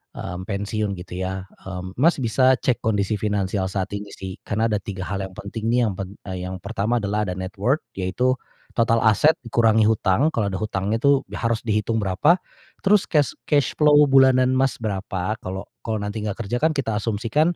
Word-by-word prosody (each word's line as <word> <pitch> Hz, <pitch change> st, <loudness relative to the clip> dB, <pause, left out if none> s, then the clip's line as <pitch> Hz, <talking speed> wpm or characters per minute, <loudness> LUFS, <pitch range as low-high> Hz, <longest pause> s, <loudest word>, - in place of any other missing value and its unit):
mmm, 90 Hz, +3 st, -6 dB
pensiun 100 Hz, 0 st, -2 dB
gitu 90 Hz, 0 st, -8 dB
ya, 95 Hz, 0 st, -3 dB, 0.2 s
mmm, 95 Hz, +3 st, -7 dB
Mas, 170 Hz, +5 st, +5 dB
bisa 130 Hz, +1 st, +3 dB
cek 125 Hz, -1 st, 0 dB
kondisi 105 Hz, -1 st, 0 dB
finansial 100 Hz, -2 st, -1 dB
saat 95 Hz, 0 st, -3 dB
ini 100 Hz, 0 st, -5 dB
sih 95 Hz, -1 st, -7 dB
kan 110 Hz, +1 st, -2 dB
ada 110 Hz, -2 st, +1 dB
tiga 95 Hz, -1 st, -6 dB
hal 100 Hz, +1 st, -3 dB
yang 95 Hz, -1 st, -6 dB
penting 110 Hz, +2 st, -5 dB
nih 120 Hz, +1 st, +3 dB
yang 105 Hz, -, 0 dB
pen 95 Hz, +1 st, -6 dB, 0.2 s
yang 90 Hz, 0 st, -4 dB
pertama 110 Hz, +4 st, -1 dB
adalah 105 Hz, +1 st, 0 dB
ada 90 Hz, -, -3 dB
net 95 Hz, 0 st, -5 dB
worth 135 Hz, +9 st, +1 dB
yaitu 125 Hz, +8 st, 0 dB, 0.4 s
total 115 Hz, -1 st, +3 dB
aset 110 Hz, +9 st, +5 dB
dikurangi 115 Hz, -3 st, +3 dB
hutang 110 Hz, +5 st, +2 dB
kalau 105 Hz, -3 st, 0 dB
ada 95 Hz, -, -3 dB
hutangnya 105 Hz, +1 st, -1 dB
tu, 140 Hz, 0 st, +3 dB
harus 115 Hz, -1 st, -1 dB
dihitung 110 Hz, 0 st, 0 dB
berapa, 100 Hz, -, +3 dB, 0.5 s
terus 205 Hz, 0 st, +4 dB
cash 150 Hz, -3 st, +2 dB, 0.2 s
cash 145 Hz, -5 st, +2 dB
flow 150 Hz, -1 st, +5 dB
bulanan 130 Hz, -2 st, +5 dB
Mas 130 Hz, -1 st, +2 dB
berapa 100 Hz, +1 st, -2 dB
kalau 95 Hz, -1 st, -5 dB, 0.2 s
kalau 110 Hz, -, -3 dB
nanti 105 Hz, +2 st, -3 dB
nggak 105 Hz, -2 st, -3 dB
kerja 120 Hz, +4 st, -2 dB
kan 155 Hz, +1 st, +2 dB
kita 115 Hz, -6 st, -1 dB
asumsikan, 115 Hz, +11 st, 0 dB
110 Hz, 190 wpm, -23 LUFS, 95-125 Hz, 0.5 s, Mas